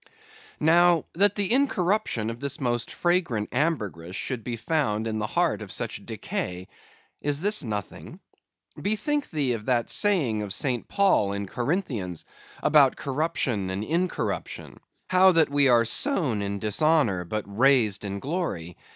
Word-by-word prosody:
Now 170 +1 +4
that 200 +4 +3
the 205 +2 +1
incorruption 195 - 0
of 115 - -9
this 140 +1 -3
most 120 -2 -1
fragrant 170 - 0
ambergris 105 - -2
should 125 0 -4
be 120 +1 -4
found 115 -3 -1
in 110 -1 -2
the 105 - -2
heart - - 0
of - - -8
such - - -3
decay; 90 +1 -5 0.5
is 145 0 -1
this 205 -2 +3
nothing? 105 -5 -6 0.6
Bethink 290 - -1
thee 140 -6 0
of 110 -2 -6
that 120 -3 +1
saying 155 - +3
of 100 -2 -4
St. 130 -5 -1
Paul 190 - +2
in 100 0 -3
Corinthians, 120 - -3 0.4
about 150 -3 +5
corruption 135 - -2
and 95 +2 -3
incorruption; 170 +8 -3 0.3
how 185 0 +6
that 165 -3 +3
we 145 -1 +4
are 120 -2 +4
sown 140 - +1
in 100 0 -3
dishonor, 110 - +1
but 105 +5 -4
raised 110 0 +2
in 100 -1 -4
glory. 115 - -4
130 Hz, 145 wpm, -25 LUFS, 105-170 Hz, 0.6 s, how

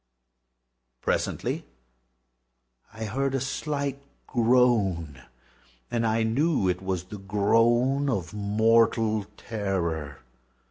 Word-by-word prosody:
Presently - - -1 1.3
I 110 0 -6
heard 135 +5 -1
a - - +1
slight 140 +1 -3 0.2
groan, 110 - +2 0.7
and 115 -1 +1
I 110 +1 +1
knew 130 - +1
it 90 0 0
was 95 -2 -2
the 100 +3 -9
groan 120 +7 +2
of 95 -9 -2
mortal 110 0 +2
terror. 85 -9 -3
110 Hz, 90 wpm, -26 LUFS, 95-125 Hz, 1.3 s, groan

